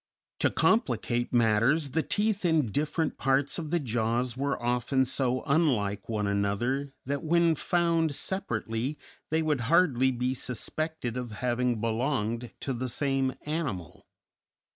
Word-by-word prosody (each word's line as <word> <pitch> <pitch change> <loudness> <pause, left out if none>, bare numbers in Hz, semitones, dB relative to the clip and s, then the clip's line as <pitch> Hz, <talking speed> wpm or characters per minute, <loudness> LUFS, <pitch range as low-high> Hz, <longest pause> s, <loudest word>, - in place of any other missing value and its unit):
To - - +3
complicate 120 - +1
matters, 120 +6 +3
the 160 - +1
teeth 210 +3 0
in 160 - +2
different 155 - -1
parts 135 +4 +1
of 160 -2 -5
the 175 +2 +1
jaws 120 -1 -1
were 140 0 -1
often 125 +2 +1
so 130 0 0
unlike 115 -11 +1
one 105 -2 -1
another 120 +8 -1
that 140 +2 -2
when 170 +1 +3
found 165 -2 +1
separately 120 - -2 0.3
they 160 +1 +1
would 150 -3 +1
hardly 145 -7 +4
be 125 0 -1
suspected 130 +1 -4
of 125 -1 -4
having 125 0 0
belonged 115 0 -1
to 135 - -1
the 125 +1 -3
same 135 0 0
animal. 140 - -4
130 Hz, 135 wpm, -28 LUFS, 120-155 Hz, 0.3 s, hardly